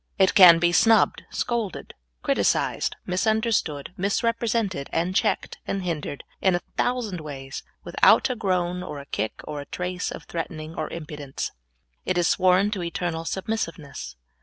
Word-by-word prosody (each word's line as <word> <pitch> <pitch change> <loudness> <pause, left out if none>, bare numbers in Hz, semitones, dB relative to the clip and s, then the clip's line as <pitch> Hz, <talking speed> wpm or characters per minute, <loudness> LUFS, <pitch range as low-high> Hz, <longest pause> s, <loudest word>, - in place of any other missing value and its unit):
It 190 -1 +4
can 180 -4 +9
be 175 +1 +3
snubbed, 225 +5 +4
scolded, 230 -6 -3 0.3
criti - - +1
cised, - - +1
misunderstood, 195 -6 0
misrepresented, 215 - 0
and 175 +3 0
checked - - 0
and 195 -1 -2
hindered 155 -5 -4 0.2
in 190 -2 +3
a 175 - -1
thousand 230 -8 -1
ways 135 -3 -7 0.2
without - - +5
a 255 - -2
groan, 180 -4 0
or 180 -5 -6
a 140 - -8
kick, 110 -5 -3
or 145 -1 -5
a - - -9
trace 180 0 -3
of - - -7
threatening 160 -2 -5
or - - -3
impudence. 150 -4 -5 0.5
It 185 - -1
is 175 -1 +3
sworn 185 +2 +3
to 200 -4 -2
eternal 170 -1 -3
submissiveness. 165 - -4
180 Hz, 150 wpm, -25 LUFS, 160-200 Hz, 0.5 s, can